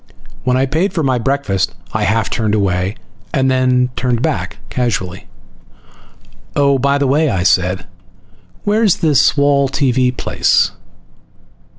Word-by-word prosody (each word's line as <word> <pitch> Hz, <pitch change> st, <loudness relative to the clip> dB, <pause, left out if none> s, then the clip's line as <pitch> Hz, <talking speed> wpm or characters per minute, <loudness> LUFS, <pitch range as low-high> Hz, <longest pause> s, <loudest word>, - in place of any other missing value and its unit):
When 125 Hz, 0 st, +2 dB
I 130 Hz, -, +2 dB
paid 160 Hz, +8 st, -1 dB
for 160 Hz, -, -1 dB
my 130 Hz, -3 st, +1 dB
breakfast 115 Hz, -9 st, -1 dB, 0.2 s
I 110 Hz, -1 st, 0 dB
half 110 Hz, +2 st, 0 dB
turned 110 Hz, -3 st, 0 dB
away, 95 Hz, -1 st, 0 dB, 0.4 s
then 130 Hz, -1 st, +2 dB
turned 125 Hz, -1 st, -1 dB
back 160 Hz, -3 st, -2 dB
casually. 100 Hz, -6 st, -2 dB, 1.3 s
"Oh, 140 Hz, -1 st, +3 dB
by 140 Hz, +2 st, +2 dB
the 140 Hz, -, 0 dB
way," 145 Hz, +3 st, +2 dB
I 95 Hz, -6 st, -1 dB
said. 90 Hz, 0 st, +1 dB, 0.8 s
"Where's 210 Hz, -2 st, +2 dB
this 150 Hz, -1 st, +3 dB
wall 140 Hz, -1 st, +3 dB
TV 130 Hz, -2 st, +1 dB
place?" -, -, +2 dB
130 Hz, 125 wpm, -16 LUFS, 110-140 Hz, 1.3 s, Oh